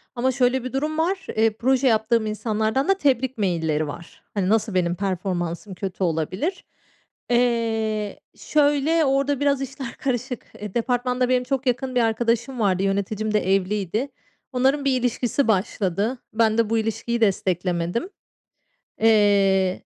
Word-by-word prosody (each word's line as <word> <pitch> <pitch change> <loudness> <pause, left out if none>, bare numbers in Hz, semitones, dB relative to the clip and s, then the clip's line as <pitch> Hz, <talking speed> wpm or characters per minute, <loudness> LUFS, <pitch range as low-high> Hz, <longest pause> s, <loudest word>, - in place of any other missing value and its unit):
ama 255 +2 +1
şöyle 250 0 +1
bir 255 - -6
durum 305 +3 -1
var. 375 +4 -1
Eee, 225 +1 +4
proje 260 +2 +2
yaptığım 220 0 +2
insanlardan 220 - -1
da 390 - +5
tebrik 260 -5 +1
mailleri 160 -6 0
var. 170 +4 -10
Hani, 195 -2 0
nasıl 220 -1 +1
benim 175 -1 +1
performansım 185 -1 -3
kötü 190 0 -4
olabilir? 185 - -2 0.7
Eee, 225 -3 0 0.2
şöyle 300 +2 +2
orada 275 0 +1
biraz 280 -1 +1
işler 270 -2 -6
karışık. 250 -2 -3 0.2
Eee, 210 -2 -6
departmanda 250 +1 0
benim 250 -1 +2
çok 265 0 -2
yakın 255 +1 -1
bir 245 - +4
arkadaşım 230 +2 0
vardı. 195 -2 +2
Yöneticim 200 +2 -1
de 195 -2 +3
evliydi. 205 +6 -1 0.4
Onların 270 +3 +1
bir 260 -2 +2
ilişkisi 245 +2 0
başladı. 200 +3 0 0.2
Ben 220 0 +2
de 225 -2 +2
bu 230 - +1
ilişkiyi 225 +2 -2
desteklemedim. 180 - 0 0.9
Eee 200 -4 +3
225 Hz, 140 wpm, -23 LUFS, 195-260 Hz, 0.9 s, da